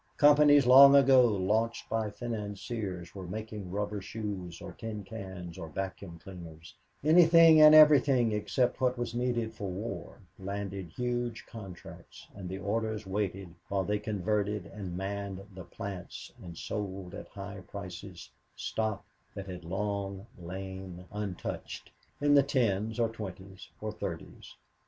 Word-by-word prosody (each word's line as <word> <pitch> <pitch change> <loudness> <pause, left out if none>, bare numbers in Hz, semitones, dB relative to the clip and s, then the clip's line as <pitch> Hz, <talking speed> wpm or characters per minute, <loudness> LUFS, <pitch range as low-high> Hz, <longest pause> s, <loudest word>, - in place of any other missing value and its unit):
Companies 145 -1 +6
long 140 +2 +9
ago 135 -2 +7
launched 110 +3 0
by 110 -1 -1
financiers 105 -4 -5
for 95 0 -8
making 105 0 -6
rubber 105 +2 -3
shoes 95 -4 -5
or - - -8
tin 110 -2 -6
cans 95 -4 -8
or 80 -2 -6
vacuum 95 0 -5
cleaners 85 -3 -11 0.3
anything 165 0 +7
and 155 0 +10
everything 140 -6 +6
except 120 +5 0
what 125 -1 +2
was 120 -1 -3
needed 120 -2 -1
for 100 -3 -5
war 100 +6 -6 0.2
landed 100 -1 -5
huge 120 +4 -3
contracts, 95 -6 -11
and 95 -2 -7
the 95 - -4
orders 110 +2 -2
waited 95 -2 -3 0.2
while 100 -1 0
they 105 +2 -1
converted 105 -1 -1
and 95 -3 -7
manned 100 0 -4
the 95 -2 -9
plants 95 +1 -7
and 85 -2 -9
sold 95 -3 -5
at - - -8
high 100 0 -8
prices 95 -2 -8 0.2
stock 110 -3 -2 0.3
that 100 - -6
had 90 -2 -8
long 100 +2 -3
lain 95 0 -7
untouched 105 -3 -5 0.3
in 145 0 +3
the 140 - +8
tens 115 -5 0
or 115 - +3
twenties 95 -3 -9
or 110 0 -4
thirties. 105 - -7
100 Hz, 135 wpm, -30 LUFS, 95-115 Hz, 0.3 s, and